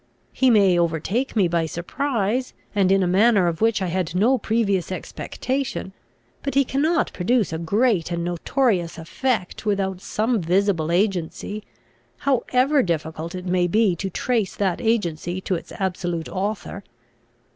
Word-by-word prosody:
He 260 - +3
may 195 -6 +5
overtake 170 - -1
me 200 -5 +4
by 170 -1 0
surprise, 240 - -2 0.2
and 195 -3 +3
in 195 0 +4
a - - +1
manner 200 +1 +4
of 170 +1 -1
which 225 -3 +2
I - - 0
had 180 -1 -2
no 240 +7 +3
previous 200 -6 0
expectation; 255 +2 -4 0.5
but 275 - -3
he 275 0 +4
cannot 305 +6 +1
produce 210 0 +1
a 160 - -2
great 200 +1 +1
and 170 0 -1
notorious 175 - 0
effect 185 +4 -2
without 195 -3 -1
some 220 +1 0
visible 175 -2 +1
agency, 195 +2 -1 0.5
however 270 +1 +2
difficult 165 -2 -3
it 180 0 -6
may 180 -1 +2
be 210 0 +3
to 195 +3 -3
trace 225 +1 -1
that 190 -4 0
agency 180 -6 0
to 190 - -2
its 170 - -4
absolute 175 -3 -2
author. 200 0 -4
195 Hz, 145 wpm, -23 LUFS, 175-230 Hz, 0.5 s, may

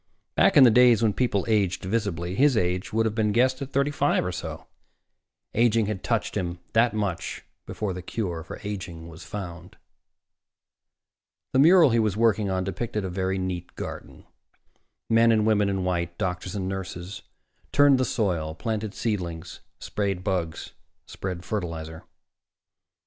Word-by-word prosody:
Back - - +4
in 140 - +10
the 120 - +7
days 120 -1 +5
when 110 -2 +3
people 110 -5 0
aged 100 -5 +1
visibly, 95 -4 -2
his 135 +3 +3
age 90 -2 -1
would 115 +1 +1
have 110 - 0
been 110 -1 +1
guessed 130 +4 +2
at 135 0 -5
thirty 140 +2 +1
five 145 -6 +1
or 90 - -1
so. - - -6 0.9
Aging 115 -1 +3
had 105 -2 -3
touched - - -1
him 85 -1 -2 0.2
that 115 -1 +3
much 100 -5 -3 0.2
before 105 -3 -3
the 90 - -6
cure 90 -3 -4
for - - -9
aging 85 -5 -6
was 80 0 -11
found. 90 -1 -8 1.8
The 130 - +3
mural 165 -1 +7
he 115 - +3
was 105 -3 0
working 110 -3 +2
on 95 -1 0
depicted 105 +1 -3
a 95 - -4
very 95 +1 -1
neat 90 -2 -4
garden. - - -8 0.8
Men 115 +1 +5
and 110 -1 +3
women 105 -2 +3
in 95 -1 -1
white, 85 -1 -2
doctors 90 +1 -3
and 95 -2 -2
nurses, 95 0 -6 0.5
turned 145 -2 +5
the - - +3
soil, 85 -10 -1
planted 110 0 -3
seedlings, 90 -6 -3 0.2
sprayed 100 -3 -2
bugs, 90 -5 -2 0.3
spread 90 -2 -6
fertilizer. 80 -5 -5
100 Hz, 155 wpm, -25 LUFS, 90-115 Hz, 1.8 s, in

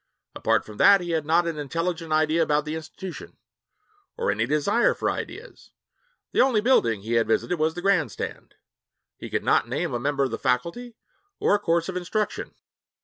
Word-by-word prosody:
Apart - - +1
from 105 -1 -11
that 200 -1 +7
he 175 -2 -4
had 160 -2 -1
not 170 +2 +3
an 165 -3 -3
intelligent 165 +3 -3
idea 155 +1 +2
about 150 -1 +1
the 155 - -4
institution, 170 +3 -8 0.8
or 475 0 0
any - - -1
desire 175 +11 +2
for - - 0
ideas. - - -8 0.6
The - - +3
only 255 -4 +3
building 120 - +2
he 115 +2 -3
had 115 -1 +2
visited 165 +9 0
was 160 +1 +1
the 175 - -6
grandstand. 195 -6 -1 0.6
He - - -9
could - - -2
not - - +2
name 145 +3 -2
a 120 - -1
member 140 +2 0
of 135 - -1
the - - -4
faculty 170 - -2 0.4
or - - +2
a 205 - +3
course 170 -3 0
of 190 - -5
instruction. 205 +4 -3
165 Hz, 185 wpm, -25 LUFS, 145-190 Hz, 0.8 s, that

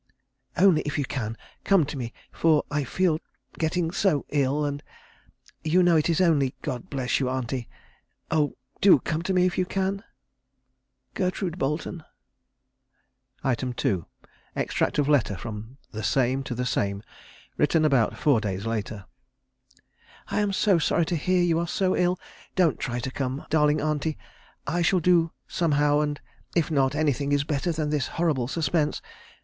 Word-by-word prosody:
Only 185 -4 +5
if 145 - -3
you 145 - 0
can, 115 -4 -4 0.3
come 195 -6 +4
to 145 - -6
me, 120 -4 -4 0.2
for 160 -2 +3
I 145 0 0
feel 165 +4 +1 0.4
getting 165 +1 0
so 175 -6 +1
ill, 145 +1 +1
and 145 0 -3 0.8
you 175 +4 +3
know 175 -1 +5
it 155 +1 +2
is 165 - +2
only 150 -8 +3
God 125 -2 -4
bless 130 -3 0
you, 130 -2 0
auntie; 130 -1 -3 0.6
oh, 150 -3 +1 0.2
do 195 -5 +8
come 155 +4 -2
to 185 - -2
me 180 -1 +3
if 185 0 0
you 185 - +2
can. 195 +1 -1 1.1
"GERTRUDE 185 -1 -2
BOLETON." 150 +4 -2 1.4
2. 120 - 0 0.5
Extract - - 0
of 145 -2 +2
letter 130 -9 +2
from 110 +5 -7
the 110 - -5
Same 130 +2 +1
to 125 - -4
the 125 +2 -2
Same, 100 -3 -1 0.5
written 155 +1 +3
about 135 -7 +2
four 140 -7 +3
days 100 -1 -3
later. 110 -3 -3 1.2
"I - - 0
am 205 -1 +1
so 195 -2 +3
sorry 165 +1 +2
to 175 - -1
hear 180 +3 +2
you 165 -2 +2
are 170 - -1
so 185 +2 +1
ill; 180 0 +1 0.4
don't 175 -5 +3
try 125 -2 -2
to 125 +2 -3
come, 135 +1 -3
darling 150 -1 +3
auntie; 155 +1 -1 0.5
I 170 +4 0
shall 180 +2 +3
do 170 -1 +3 0.2
somehow, 145 -3 +2
and 150 -1 -1 0.4
if 165 -2 +1
not, 135 -2 +2
anything 145 -2 0
is 145 0 +3
better 150 +3 -1
than 155 -2 -2
this 145 -4 0
horrible 155 -8 +1
suspense.... 155 +1 0
150 Hz, 160 wpm, -26 LUFS, 130-170 Hz, 1.4 s, do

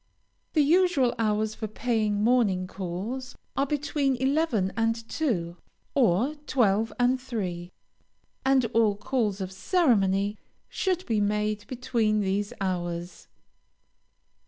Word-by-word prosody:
The 305 - +4
usual 315 -5 +3
hours 215 -1 +1
for 220 - -5
paying 215 -2 0
morning 215 -6 +3
calls 200 +8 -5 0.2
are 275 - +1
between 285 -1 0
eleven 260 - +1
and 225 0 +1
two, 180 - -2 0.4
or 245 - +3
twelve 225 -3 +2
and 250 +1 +2
three, 185 -9 -4 0.7
and 265 -2 +3
all 220 -3 +3
calls 215 -4 -1
of 185 0 -4
ceremony 200 - +2 0.3
should 370 -1 -1
be 220 -3 +1
made 210 0 -1
between 235 -4 0
these 200 +1 -1
hours. 175 -2 -3
220 Hz, 110 wpm, -27 LUFS, 195-260 Hz, 0.7 s, The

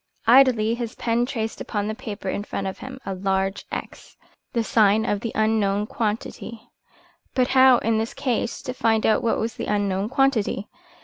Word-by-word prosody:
Idly 235 -3 +5
his 235 -1 -4
pen 235 +1 0
traced 225 -4 -4
upon 205 -2 -3
the 215 - -2
paper 205 -3 -7
in 200 - -2
front 200 - -4
of 190 - -5
him 260 +1 -8
a 195 - -3
large 190 +1 -1
X, - - -7 0.3
the 235 -2 0
sign 215 -1 +3
of 205 - 0
the 230 +2 -4
unknown 210 -2 +1
quantity. 225 +1 -4 0.6
But 255 -1 +2
how, 260 -1 +6
in 225 -1 0
this 225 +1 -3
case, 245 -1 -2
to 255 -2 -4
find 225 -3 +1
out 220 - +3
what 230 - +1
was 225 0 -2
the - - -4
unknown 200 -1 0
quantity? 255 -7 +1
220 Hz, 180 wpm, -23 LUFS, 205-240 Hz, 0.6 s, how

